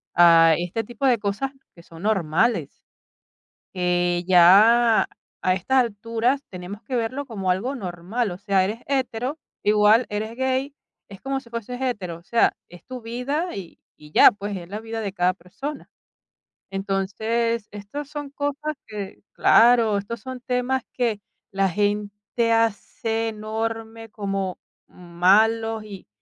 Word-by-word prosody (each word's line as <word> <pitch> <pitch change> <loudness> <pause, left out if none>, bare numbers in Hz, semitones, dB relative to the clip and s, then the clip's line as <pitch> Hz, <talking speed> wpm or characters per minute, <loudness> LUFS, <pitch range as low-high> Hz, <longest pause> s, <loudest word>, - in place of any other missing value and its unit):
a 165 -1 +7
este 180 +6 -3
tipo 240 +4 -5
de 250 -4 +4
cosas 205 +7 -2 0.2
que 170 - -15
son 165 +2 -13
normales, 205 +2 0 0.9
que 175 -1 +1
ya 215 +6 +6 0.3
a 185 - +2
estas 250 +9 +1
alturas, 230 +3 0
tenemos 185 +3 -8
que 255 - -4
verlo 250 +4 -2
como 195 -7 -2
algo 230 +10 -1
normal, 195 +2 -3
o 175 - -6
sea, 195 -1 +1
eres 215 +4 -3
hetero, 265 +1 -2 0.2
igual 210 +3 +5
eres 215 +2 -4
gay, 260 +2 -1 0.4
es 195 -1 -12
como 270 0 -2
si 245 - -18
fueses 235 +1 -5
hetero, 205 -10 -3
o 170 - -19
sea, 230 +5 +2 0.2
es 175 -1 -14
tu 255 -1 -7
vida 260 +9 -3
y 185 -4 -9 0.2
y 150 0 -15
ya, - - +8
pues, 205 0 -5
es 175 -2 -8
la 205 +2 -5
vida 225 0 -5
de 200 -2 -3
cada 180 -1 +1
persona. 205 - -8 0.8
Entonces, 205 +4 -1
estas 210 +8 -7
son 290 -1 -6
cosas 290 +2 -3
que 205 -3 -7
claro, 230 -3 +5
estos 205 +3 -5
son 255 +2 -8
temas 250 0 -1
que 230 -5 0 0.3
la 195 -1 +1
gente 205 +3 -1
hace 225 0 0
enorme, 225 +1 -5
como 195 -3 -3 0.3
malos 215 +6 +2
y 200 -3 -11
220 Hz, 145 wpm, -23 LUFS, 195-240 Hz, 0.9 s, ya